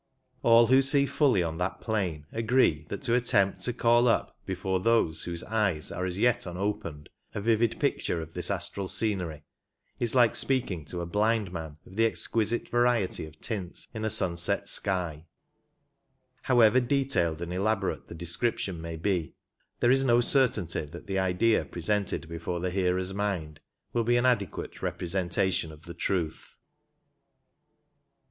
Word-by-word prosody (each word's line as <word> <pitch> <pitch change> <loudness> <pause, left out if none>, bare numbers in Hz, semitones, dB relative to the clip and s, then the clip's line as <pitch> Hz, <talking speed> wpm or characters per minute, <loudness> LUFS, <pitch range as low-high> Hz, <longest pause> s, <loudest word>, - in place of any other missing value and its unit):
All 115 0 +6
who 130 +3 +5
see 140 +1 +4
fully 135 - +2
on 80 0 -4
that 90 +2 -2
plane 95 -9 -2
agree 110 -9 +1
that 100 - -5
to 120 -3 +1
attempt 100 -5 +2
to 125 - +1
call 120 0 +3
up 115 - +1
before 95 0 -1
those 90 -7 +2
whose 85 -1 -4
eyes 105 -8 0
are 90 +1 -3
as 90 0 -4
yet 120 0 +1
unopened 85 -5 -4 0.3
a - - -1
vivid 115 +2 +1
picture 85 - 0
of 80 0 -8
this - - 0
astral 100 -1 -2
scenery 90 -9 -2 0.6
is 120 +1 +1
like 120 -3 +5
speaking 105 - +1
to 85 +4 -5
a - - -3
blind 105 +1 0
man 80 -3 -6
of 95 - -14
the 115 - +4
exquisite 115 0 0
variety 120 -9 +1
of 80 0 -16
tints 95 -6 -3
in 110 -2 -5
a 110 - 0
sunset 95 -1 +2
sky 85 -6 -2 0.5
— - - -45
however 120 -1 +6
detailed 125 - 0
and 85 0 -5
elaborate 100 +1 -1
the - - -9
description 85 +1 -2
may 85 0 -6
be, 85 -1 -2 0.5
there 120 - +4
is 135 +1 +4
no 120 -2 +4
certainty 115 - +2
that 80 +4 -10
the 95 -1 -1
idea 95 +5 +2
presented 95 0 -2
before 85 +1 -4
the 90 +1 -2
hearer's 95 0 0
mind 95 -7 -3 0.3
will 120 - +1
be 120 +2 +2
an 120 - +1
adequate 105 -8 -1
representation 90 -1 -1
of 75 +1 -14
the 85 - -8
truth. 85 -5 -3
95 Hz, 160 wpm, -28 LUFS, 85-115 Hz, 0.6 s, All